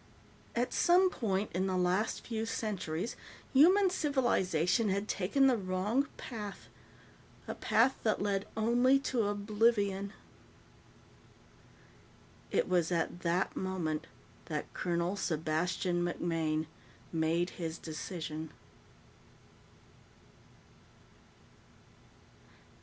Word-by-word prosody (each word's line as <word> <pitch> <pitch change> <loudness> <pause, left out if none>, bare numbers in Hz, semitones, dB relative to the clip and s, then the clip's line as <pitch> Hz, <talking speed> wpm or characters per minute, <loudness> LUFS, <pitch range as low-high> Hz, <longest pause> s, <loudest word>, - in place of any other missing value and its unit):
At 245 +2 0
some 365 +1 +4
point 205 - -1
in 185 +2 0
the 185 -1 0
last 180 +4 0
few 225 -1 -3
centuries, 195 -4 -3 0.4
human 365 +7 +6
civilization 230 - +1
had 200 +2 -1
taken 215 +10 +2
the 260 -2 +5
wrong 205 +7 0
path 210 -4 -7 0.8
a - - -3
path 250 +4 +2
that 215 -2 +1
led 200 -1 -1
only 240 +4 +4
to 235 -6 0
oblivion. 205 -1 +1 2.4
It - - +1
was 180 -2 +1
at 170 0 -1
that 175 +2 0
moment 170 -4 -2 0.4
that 150 -2 -4
Colonel 175 +1 -1
Sebastian 175 +1 0
MacMaine 165 -3 -1 0.5
made 165 +2 +1
his 165 0 -3
decision. 160 -1 -6
190 Hz, 90 wpm, -32 LUFS, 170-225 Hz, 2.4 s, human